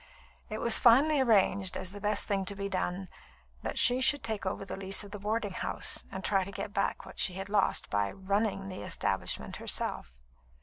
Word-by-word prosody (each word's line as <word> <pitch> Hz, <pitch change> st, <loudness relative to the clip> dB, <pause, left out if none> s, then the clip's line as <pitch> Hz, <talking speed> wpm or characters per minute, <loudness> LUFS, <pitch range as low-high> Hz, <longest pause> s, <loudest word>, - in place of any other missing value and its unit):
It 215 Hz, -, -4 dB
was 235 Hz, +1 st, +5 dB
finally 275 Hz, +5 st, +5 dB
arranged, 200 Hz, -5 st, +2 dB
as 185 Hz, -, -3 dB
the 205 Hz, 0 st, -9 dB
best 210 Hz, -1 st, +2 dB
thing 195 Hz, -1 st, 0 dB
to 200 Hz, -, -1 dB
be 200 Hz, 0 st, -4 dB
done, 185 Hz, 0 st, -3 dB, 0.5 s
that -, -, -5 dB
she 250 Hz, +2 st, +4 dB
should 285 Hz, +2 st, +5 dB
take 215 Hz, -4 st, -3 dB
over 190 Hz, -, -3 dB
the -, -, -6 dB
lease 195 Hz, +1 st, -1 dB
of 205 Hz, -, -10 dB
the 205 Hz, -, -7 dB
boarding 210 Hz, 0 st, -2 dB
house -, -, 0 dB
and 190 Hz, -, -6 dB
try 195 Hz, -1 st, +1 dB
to 195 Hz, -, -8 dB
get 200 Hz, +1 st, -6 dB
back 200 Hz, -, -1 dB
what -, -, -11 dB
she 185 Hz, -, +3 dB
had 195 Hz, +1 st, -6 dB
lost, 205 Hz, -1 st, +1 dB
by 105 Hz, -1 st, 0 dB
"running" 195 Hz, 0 st, -2 dB
the 185 Hz, -, -7 dB
establishment -, -, -3 dB
herself. 60 Hz, -, -2 dB
200 Hz, 205 wpm, -30 LUFS, 190-215 Hz, 0.5 s, was